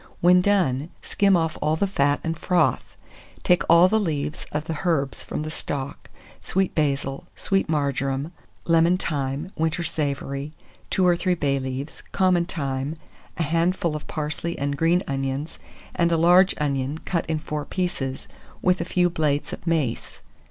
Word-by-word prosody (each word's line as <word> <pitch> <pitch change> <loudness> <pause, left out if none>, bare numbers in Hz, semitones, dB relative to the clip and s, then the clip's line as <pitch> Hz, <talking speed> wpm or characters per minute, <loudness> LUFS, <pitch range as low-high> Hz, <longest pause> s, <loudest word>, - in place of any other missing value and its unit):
When 180 +1 +6
done, 175 -8 +1
skim 195 -2 +3
off 165 -1 -1
all 155 - +2
the 180 - +1
fat 145 -7 +1
and 165 0 -1
froth. 180 +2 0 0.5
Take 180 -1 +4
all 170 +2 +8
the 220 +3 +2
leaves 150 -6 -2
of 150 +1 -2
the 160 -2 -4
herbs 150 -7 0
from - - -4
the 155 - -5
stock, 140 -3 -5 0.3
sweet 190 0 0
basil, 140 -3 -1
sweet 195 -4 0
marjoram, 140 0 -1 0.3
lemon 165 +2 +4
thyme, 145 +1 -2
winter 160 +2 0
savory, 140 -1 -3 0.4
2 185 - +2
or 175 -1 +5
3 180 +1 +1
bay 140 -4 0
leaves, 130 +3 -5
common 185 -3 +3
thyme, 140 -4 -3 0.4
a 170 - +1
handful 165 +1 +1
of 150 - -6
parsley 155 +2 -3
and 140 0 -1
green 165 +5 +2
onions, 135 +2 -3 0.3
and 170 -1 +2
a 165 - +3
large 180 +3 +5
onion 140 0 -1
cut 170 -3 -1
in 160 -1 0
four 150 -1 -4
pieces, 150 -6 -3 0.3
with 180 -1 +2
a - - -2
few 180 0 +2
blades 150 -4 -1
of - - -8
mace. 155 -8 -1
160 Hz, 160 wpm, -24 LUFS, 140-175 Hz, 0.5 s, all